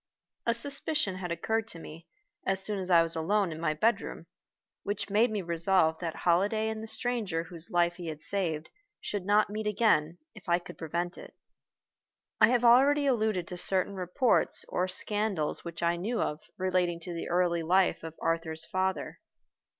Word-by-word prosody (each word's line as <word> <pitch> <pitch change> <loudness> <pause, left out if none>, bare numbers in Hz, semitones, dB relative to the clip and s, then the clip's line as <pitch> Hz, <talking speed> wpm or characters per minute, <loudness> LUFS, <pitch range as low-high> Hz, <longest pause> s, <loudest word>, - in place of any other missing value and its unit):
A 235 - +3
suspicion 275 -4 -1
had 180 -2 -5
occurred 220 +6 -1
to 170 - -4
me, 165 +1 -11 0.4
as 195 0 0
soon 210 -2 -1
as 185 -1 -2
I 170 -2 +6
was 165 0 -5
alone 190 +3 +1
in 155 - -6
my 155 -2 0
bedroom, 225 +9 0 0.6
which 205 0 -3
made 220 +4 +4
me 210 -3 -3
resolve 170 -1 +3
that 165 -2 -4
Holliday 205 +6 +2
and 220 0 -4
the 220 - -7
stranger 220 -9 -1
whose 170 0 -8
life 175 0 +1
he 175 -2 -7
had 155 -2 -5
saved 165 -5 0 0.3
should 200 -2 -4
not 205 0 +3
meet 215 0 -3
again, 190 -7 +2 0.2
if 205 -4 -12
I 170 - +4
could 180 - -11
prevent 170 +2 -3
it. - - -12 1.0
I - - +7
have 245 0 +2
already 275 +5 +6
alluded 215 -9 +1
to 180 - -6
certain 190 +2 0
reports 185 +6 +1
or 180 - 0
scandals 195 -3 -1
which 170 0 -6
I 170 0 +2
knew 220 +7 -2
of 150 +1 -2 0.2
relating 180 -2 0
to 175 +1 -6
the 165 - -5
early 175 -1 +1
life 180 +3 +2
of 165 -1 -7
Arthur's 165 -1 -1
father. 190 0 -2
185 Hz, 180 wpm, -29 LUFS, 170-215 Hz, 1.0 s, I